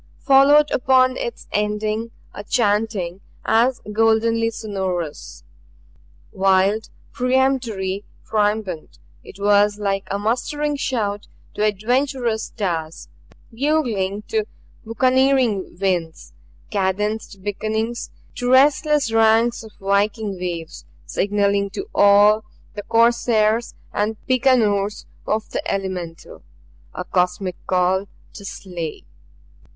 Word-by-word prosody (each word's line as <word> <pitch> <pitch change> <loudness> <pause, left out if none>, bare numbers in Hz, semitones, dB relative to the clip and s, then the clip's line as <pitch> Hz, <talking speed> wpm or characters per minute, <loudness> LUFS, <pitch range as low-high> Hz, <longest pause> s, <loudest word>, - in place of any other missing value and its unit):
Followed 285 +2 +6
upon 255 0 +3
its 235 - -5
ending, 210 +2 -1 0.2
a 205 - -7
chanting 205 -5 0 0.2
as 240 +3 +2
goldenly 225 +1 +2
sonorous. 190 -8 -5 0.9
Wild, 195 +3 +2 0.2
peremptory, 250 -7 0 0.2
triumphant. 210 -5 -1 0.3
It - - -13
was 205 0 +3
like 195 -1 -2
a 200 - -1
mustering 290 +8 -1
shouting 215 -7 -2 0.2
to 210 - -2
adventurous 235 +2 0
stars, 165 -6 -4 0.4
buglings 225 -8 0
to 435 -1 0 0.4
buccaneering 255 -4 +1
winds, 175 -4 -2 0.4
cadenced 205 0 -2
beckonings 220 +3 -3 0.3
to 245 - -1
restless 285 0 +4
ranks 225 +1 +3
of 220 -1 -12
viking 200 +1 0
waves, 170 -2 -5 0.2
signaling 200 0 0
to 225 - -6
all 205 +2 +5 0.3
the 205 - -5
corsairs 230 0 +2 0.2
and 210 +1 -1
picaroons 225 -6 +2 0.2
of 215 +1 -1
the - - -2
elemental. 185 -4 -5 0.5
A - - -4
cosmic 180 0 -1
call 185 +2 +1 0.3
to 205 - -10
slay! 175 -5 -6
210 Hz, 95 wpm, -21 LUFS, 195-235 Hz, 0.9 s, Followed